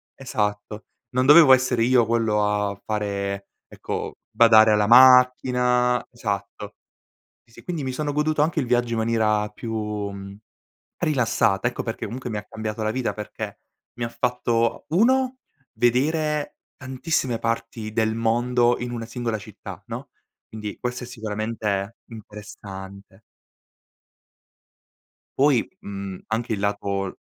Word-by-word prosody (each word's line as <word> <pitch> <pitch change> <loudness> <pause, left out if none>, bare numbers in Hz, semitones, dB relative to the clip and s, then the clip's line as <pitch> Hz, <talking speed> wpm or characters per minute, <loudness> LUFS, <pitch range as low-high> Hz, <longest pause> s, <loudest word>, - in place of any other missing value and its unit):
Esatto. 105 -4 -3 0.2
Non 130 +1 0
dovevo 150 -1 +9
essere 125 -2 +2
io 125 -1 +4
quello 110 -2 +1
a 105 -1 -1
fare 100 -2 -3 0.2
ecco - - -5
badare 110 -2 +6
alla 105 -1 +3
macchina, 125 0 +5
esatto. 100 -2 -5 0.7
Sì - - -31
sì, - - -15
quindi 170 -4 -4
mi 130 -1 -3
sono 145 +3 -2
goduto 150 +1 +1
anche 155 +1 +1
il 130 - -2
viaggio 120 -1 +1
in 115 - 0
maniera 110 -2 +1
più, 115 +1 -7
mhmm, 100 -2 -4 0.7
rilassata 120 -7 +1
ecco 120 - -3
perché 115 - -4
comunque 125 +4 -6
mi 110 - -3
ha 105 - -6
cambiato 110 0 -5
la 110 - 0
vita 125 +1 -2
perché 105 -2 -7 0.4
mi - - -2
ha 115 - -2
fatto: 120 -1 -1
1 255 +8 +2 0.4
vedere 150 +5 0 0.2
tantissime 130 -1 -2
parti 115 -1 -3
del 110 -1 +1
mondo 120 +1 +2
in 125 - -4
una 115 -1 -5
singola 115 -1 -3
città 100 - -10
no; - - -7 0.4
quindi 105 -1 -7
questo 125 0 -4
è - - -8
sicuramente 110 -2 -3
interessante. 100 -2 -11 2.2
Poi, 135 -4 +5 0.2
mhmm, 100 -1 -6
anche 110 +1 -1
il 105 - -3
lato 100 -1 -1
l 95 - -8
115 Hz, 135 wpm, -23 LUFS, 105-125 Hz, 2.2 s, dovevo